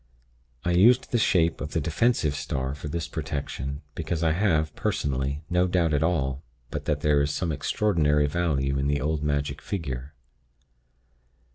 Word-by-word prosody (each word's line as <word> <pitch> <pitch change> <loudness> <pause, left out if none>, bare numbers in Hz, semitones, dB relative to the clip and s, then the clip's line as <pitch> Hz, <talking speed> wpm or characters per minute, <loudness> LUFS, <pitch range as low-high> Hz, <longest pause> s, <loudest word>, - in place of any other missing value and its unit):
I 90 - +2
used 115 +9 +5
the 120 - +2
shape 85 -5 +2
of 75 - -5
the - - +1
defensive 85 - +1
star 65 -2 -3
for 75 +1 -7
this 85 +1 -3
protection, 70 -2 -4
because 85 0 -3
I 80 - +3
have, 80 -4 +1
personally, 70 +2 -1
no 90 +1 +2
doubt 85 -3 +1
at 75 - +2
all 70 -5 0 0.3
but - - -4
that 75 -1 0
there 75 -1 +3
is 70 - +1
some 80 +3 -1
extraordinary 75 -1 +2
virtue 70 -4 0
in 70 - 0
the 70 0 +1
old 75 +1 -1
magic 70 -1 -1
figure. 70 -6 -5
75 Hz, 160 wpm, -26 LUFS, 70-85 Hz, 0.3 s, used